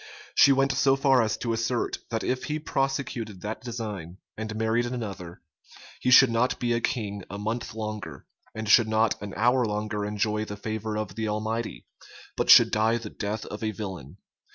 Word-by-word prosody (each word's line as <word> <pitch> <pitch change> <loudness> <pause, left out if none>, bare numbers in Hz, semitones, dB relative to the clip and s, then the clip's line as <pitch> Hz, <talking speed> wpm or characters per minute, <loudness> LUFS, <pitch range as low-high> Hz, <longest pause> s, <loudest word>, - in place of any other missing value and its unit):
She 140 - +6
went 135 0 +3
so 135 0 +3
far 135 -2 +4
as 110 -1 0
to 115 -2 -2
assert, 115 +1 -1
that 115 -1 -2
if 130 0 -1
he 150 - -2
prosecuted 135 - -2
that 105 +2 -5
design, 105 -8 -6 0.2
and 110 0 -5
married 110 +2 +1
another, 100 -8 -6 0.6
he 125 - 0
should 125 0 +8
not 115 +2 +1
be 120 -1 0
a 115 - 0
king 105 -6 -2
a 100 - -6
month 110 +2 -4
longer, 105 - -6 0.3
and 110 0 -4
should 110 +2 +6
not 110 -1 +1
an 105 -1 -7
hour 125 +4 +3
longer 105 -1 -2
enjoy 105 +1 -1
the 105 -1 -7
favor 110 +1 -4
of 105 -3 -4
the 110 +1 -3
Almighty, 110 +2 -3 0.5
but - - -1
should - - +9
die 110 +2 +2
the 110 -3 -8
death 105 +1 -4
of 105 - -7
a 110 - -1
villain. 95 - -7
110 Hz, 185 wpm, -26 LUFS, 105-120 Hz, 0.6 s, should